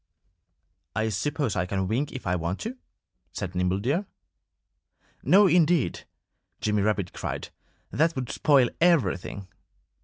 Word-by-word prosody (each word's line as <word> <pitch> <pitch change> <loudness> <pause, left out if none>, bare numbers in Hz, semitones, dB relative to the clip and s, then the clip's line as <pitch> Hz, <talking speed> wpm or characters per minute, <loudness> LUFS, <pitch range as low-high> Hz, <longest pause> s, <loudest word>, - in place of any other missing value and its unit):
"I 110 +1 0
suppose 135 +3 -1
I 90 -1 0
can 95 0 -1
wink 130 +8 -1
if 130 - -8
I 90 0 +1
want 85 +2 -2
to," 230 +4 -4 0.6
said 90 - -4
Nimble 90 +1 0
Deer. 145 - -1 1.1
"No, 205 +2 +6
indeed!" 170 - +2 0.5
Jimmy 105 -1 +1
Rabbit 100 -3 0
cried. - - -5 0.4
"That 165 +2 +2
would 130 -3 -3
spoil 135 -5 +3
everything." 100 - +1
110 Hz, 125 wpm, -26 LUFS, 95-155 Hz, 1.1 s, No